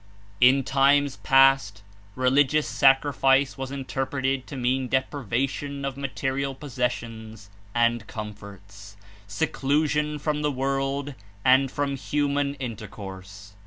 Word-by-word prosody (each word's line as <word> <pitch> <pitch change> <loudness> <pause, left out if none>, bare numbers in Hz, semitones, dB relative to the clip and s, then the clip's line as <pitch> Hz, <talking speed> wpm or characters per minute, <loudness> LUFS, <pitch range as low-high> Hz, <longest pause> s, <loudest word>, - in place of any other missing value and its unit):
In 130 +2 +5
times 140 +1 +2
past 135 -7 +3 0.3
religious 135 +4 +2
sacrifice 135 0 +3
was 135 -1 -5
interpreted 135 -1 -2
to 140 - -7
mean 130 +1 0
deprivation 135 +2 -2
of 135 -1 -3
material 135 0 -3
possessions 115 -6 -5 0.2
and 120 -2 +1
com 105 -1 -6
forts, 100 0 -13 0.3
seclusion 150 +8 0
from 150 0 -2
the 150 -1 0
world 135 +1 -2 0.3
and 130 +1 +5
from 140 0 -2
human 145 0 -1
in 125 -5 -5
tercourse. 100 -1 -10
135 Hz, 110 wpm, -25 LUFS, 115-140 Hz, 0.3 s, In